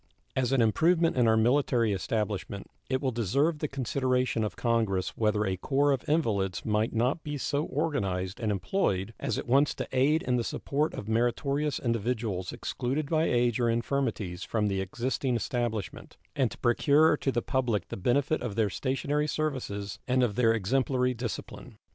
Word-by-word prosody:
As 130 -1 +1
an 135 -3 +4
improvement 165 +9 +3
in 125 -2 +3
our 110 0 +4
military 120 -2 +2
establishment, 100 0 -3 0.2
it 130 0 0
will 130 - +1
deserve 140 - +1
the 150 - -1
consideration 130 -3 0
of 105 - -3
Congress 110 -6 0
whether 105 -1 +1
a 95 -1 -1
corps 140 +8 +2
of 135 0 -2
invalids 105 - 0
might 110 +1 +1
not 125 +8 0
be 145 -1 -4
so 145 +2 -1
organized 100 - -2
and 110 -3 0
employed 100 - -1
as - - -2
at - - -4
once 140 +4 +3
to - - -4
aid 140 +5 +2
in 125 -1 +1
the 120 - 0
support 145 +6 -2
of 100 - -6
meritorious 140 +6 0
individuals 115 -5 -2
excluded 140 +5 -3
by 160 0 +3
age 120 -3 +2
or 120 -1 +2
infirmities 115 -7 -1
from 105 -2 0
the 95 -1 -1
existing 125 +6 -2
establishment, 120 -4 -3 0.2
and 130 -4 +2
to - - -10
procure 145 +6 +4
to 135 - -1
the 120 - -1
public 120 -8 -1
the - - -4
benefit 135 +10 +1
of 115 -5 -4
their 110 -3 +1
stationary 145 +5 -1
services 130 -10 -3
and 125 0 +3
of 115 -4 +1
their 115 -2 +4
exemplary 125 +4 +1
discipline. 115 -3 -6
120 Hz, 170 wpm, -28 LUFS, 110-140 Hz, 0.2 s, an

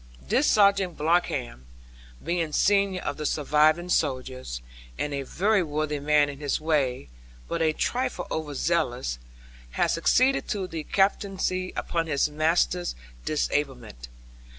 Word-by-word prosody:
This - - +2
Sergeant 200 -4 +3
Bloxham, 140 - 0 0.6
being 170 -3 -1
senior 195 -1 +2
of - - -3
the 155 - -4
surviving 155 +4 +2
soldiers, 130 - -1 0.4
and 150 - -2
a 140 - -2
very 195 +9 +1
worthy 150 -2 -2
man 145 0 +3
in 140 -1 -7
his 145 -2 -1
way, 145 - 0 0.4
but 170 - -2
a 160 -1 +3
trifle 245 +2 -2
over 150 -2 -3
zealous, 130 - -1 0.5
had - - +2
succeeded 255 +11 +2
to 200 -3 -2
the 165 -4 -6
captaincy 195 -2 0
upon 165 -1 -2
his 145 -1 +1
master's 165 +3 +1 0.3
disablement. 130 - -2
155 Hz, 130 wpm, -26 LUFS, 145-180 Hz, 0.6 s, Sergeant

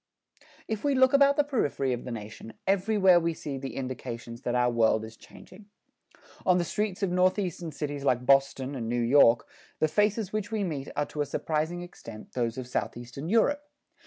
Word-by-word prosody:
If 220 -2 -3
we 285 -1 +2
look 260 0 +4
about 280 0 +5
the 295 - +4
periphery 145 - 0
of 120 - -5
the 125 - -5
nation, 110 0 -8
everywhere 195 -2 +4
we 165 -1 -1
see 140 -4 -5
the 135 0 -6
indications 120 -2 -6
that 120 -1 -2
our 125 0 +3
world 110 -2 +2
is 110 +1 -11
changing. 200 - -15 0.8
On 180 -1 +4
the 175 - +1
streets 205 +2 -2
of 190 - +1
Northeastern 180 -2 0
cities 145 -1 -4
like 130 -3 +3
New - - -14
York 135 0 +4
and 130 +1 -4
Boston, 120 +1 +3 0.3
the 155 - +2
faces 210 +4 0
which 215 0 -3
we 215 -2 -1
meet 150 -7 -4
are 145 - 0
to 150 - -5
a - - +1
surprising 160 +5 -2
extent 115 -11 -11
those 120 -2 -1
of 130 - -4
Southeastern 120 +5 -4
Europe. 260 +7 +3
150 Hz, 190 wpm, -28 LUFS, 125-195 Hz, 0.8 s, about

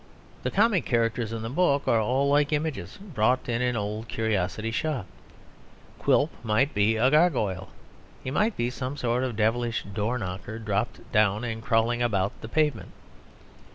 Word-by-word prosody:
The - - -1
comic 205 -3 +3
characters 115 -1 0
in 115 -1 -4
the 115 - -3
book 145 -2 +2
are 115 - +4
all 130 +6 +1
like 145 +1 +3
images 150 -1 -2
bought 130 - 0
in 120 0 -1
an 125 -1 +1
old 105 +1 -3
curiosity 110 0 -1
shop. 135 - -2 0.9
Quilp 150 +3 +3
might 115 +6 +2
be 105 +2 +3
a 130 +4 +3
gargoyle. 125 - +2 0.5
He 130 - -4
might 210 +9 +1
be 120 +1 0
some 130 +2 -4
sort 125 0 0
of 125 -3 -2
devilish 115 +2 0
door 105 +5 -2
knocker, 100 +1 -5
dropped 105 0 -3
down 105 0 +3
and 115 -2 -4
crawling 115 +1 +1
about 100 -5 +1
the 110 - -7
pavement. 150 -5 0
115 Hz, 160 wpm, -26 LUFS, 110-135 Hz, 0.9 s, are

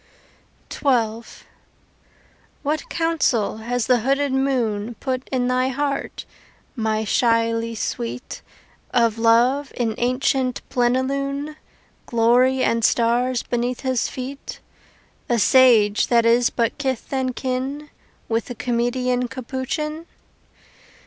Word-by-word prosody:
XII 230 -5 +1 1.4
What 305 +2 -2
counsel 315 -11 0
has 235 +1 -2
the 250 -1 +3
hooded 275 +4 0
moon 240 -5 0
Put 260 -1 -3
in 250 -2 0
thy 255 +1 +1
heart, 275 +1 -3 0.5
my 220 -2 -1
shyly 230 0 +1
sweet, 120 - -4 0.5
Of 230 -2 +1
Love 245 +5 +3
in 230 -3 0
ancient 255 +1 0
plenilune, 275 +4 -1 0.5
Glory 245 +3 +3
and 230 0 +1
stars 240 +2 +2
beneath 245 +1 -2
his 260 -3 0
feet 270 +2 -7 0.7
A 240 - +2
sage 225 -3 +5
that 235 -1 +3
is 235 +1 +4
but 235 +3 -1
kith 265 -2 -3
and 260 -2 -1
kin 265 +3 -3 0.4
With 230 0 -1
the 245 - -7
comedian 245 +2 0
Capuchin? 280 +6 -4
250 Hz, 105 wpm, -22 LUFS, 230-265 Hz, 1.4 s, sage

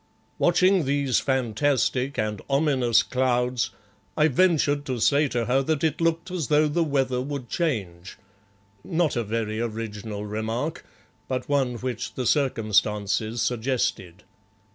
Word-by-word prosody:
Watching 180 0 +3
these 140 -2 +1
fantastic 130 +1 0
and 105 -2 -2
ominous 130 -5 +3
clouds, 125 -2 0 0.5
I 155 +1 +4
ventured 145 -2 +2
to 130 -2 -2
say 145 +6 +3
to 120 -3 -1
her 130 +3 +2
that 155 +2 -1
it 160 0 0
looked 165 +2 0
as 170 -7 -2
though 150 +1 +4
the 165 +3 +1
weather 135 -4 0
would 135 -2 -5
change 100 - -3 0.7
not 170 -3 0
a 120 - 0
very 110 0 -2
original 110 -2 -4
remark, 110 +8 -3 0.4
but 130 -1 -3
one 135 -4 +1
which 120 -1 -4
the 130 - -3
circumstances 110 -4 +1
suggested. 110 -7 -2
130 Hz, 130 wpm, -25 LUFS, 115-145 Hz, 0.7 s, I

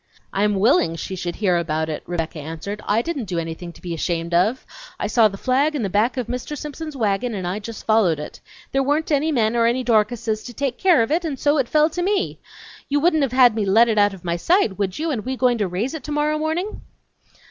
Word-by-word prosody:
"I'm 205 +1 +1
willing 200 - +3
she 190 +3 -5
should 175 -1 -4
hear 185 -5 +1
about 160 -1 -1
it," 155 -1 -4
Rebecca 165 -2 -3
answered. 165 +7 -6
"I 220 +3 +2
didn't 290 -7 -3
do 180 -3 -4
anything 165 +1 -5
to - - -18
be 175 -2 -4
ashamed 170 +1 -2
of! 205 +9 +2 0.3
I - - -1
saw 230 -3 +4
the 195 -1 -7
flag 275 +7 +1
in 265 - -1
the 195 - -2
back 220 +7 +1
of 250 - -1
Mr. 250 +5 -5
Simpson's 300 0 -7
wagon 220 +1 0
and 185 -2 -4
I 180 +4 -2
just 220 +1 -8
followed 210 -8 +3
it. 150 - -8 0.3
There 270 - +2
weren't 295 +4 0
any 300 +2 +2
men 230 -4 +1
or 230 -1 +3
any 250 +2 0
Dorcases 220 -1 +1
to 245 - -8
take 275 -2 -2
care 350 -10 +5
of 225 - -4
it 335 +3 +1
and 305 -5 -3
so 290 +2 +2
it 255 - 0
fell 305 +1 +3
to 355 - -3
me! 390 +2 0 0.5
You 290 +1 +2
wouldn't 315 0 +3
have 275 -3 +1
had 250 -2 +6
me 215 -1 -1
let 215 +4 +5
it 220 -2 +2
out 205 -1 +3
of 180 - -15
my 170 0 -1
sight, 230 - +1
would 195 -2 -1
you, 320 +1 -1
and 230 -7 -2
we 260 +1 -3
going 245 -2 +2
to 205 - +1
raise 195 - -2
it 315 -5 -6
tomorrow 300 +1 0
morning?" 330 +7 -2
230 Hz, 245 wpm, -22 LUFS, 190-290 Hz, 0.5 s, had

